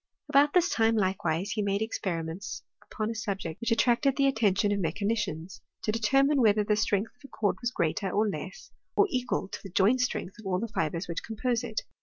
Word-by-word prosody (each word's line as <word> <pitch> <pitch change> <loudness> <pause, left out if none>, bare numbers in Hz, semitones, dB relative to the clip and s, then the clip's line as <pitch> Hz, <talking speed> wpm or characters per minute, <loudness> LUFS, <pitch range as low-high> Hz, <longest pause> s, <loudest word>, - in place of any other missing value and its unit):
About 290 0 +4
this 360 0 +5
time, 225 - +2
likewise, 185 -2 0
he 215 - -1
made 200 +1 0
experiments 180 -4 -4 0.3
upon 215 +1 -2
a - - -3
subject 195 -7 -4
which 235 - -1
attracted 240 +3 +3
the 275 - +3
attention 210 -6 +2
of 205 - 0
me 165 -4 0
chanicians— 200 -4 -3 0.2
to 215 - +1
determine 270 +6 +3
whether 210 -2 +4
the 210 +1 +2
strength 210 0 0
of - - -35
a - - -10
cord 210 -6 -1
was 240 - 0
greater, 190 -2 -1
or 210 +4 +1
less, 345 - -6 0.2
or 410 - +5
equal 250 -6 -1
to - - -7
the 195 - -9
joint 205 +8 +3
strength 230 -4 -2
of 215 - -8
all 180 -1 0
the 230 - -2
fibres 165 -3 -2
which 170 0 -3
compose 235 +2 -1
it. 225 -3 -3
215 Hz, 210 wpm, -28 LUFS, 190-240 Hz, 0.3 s, this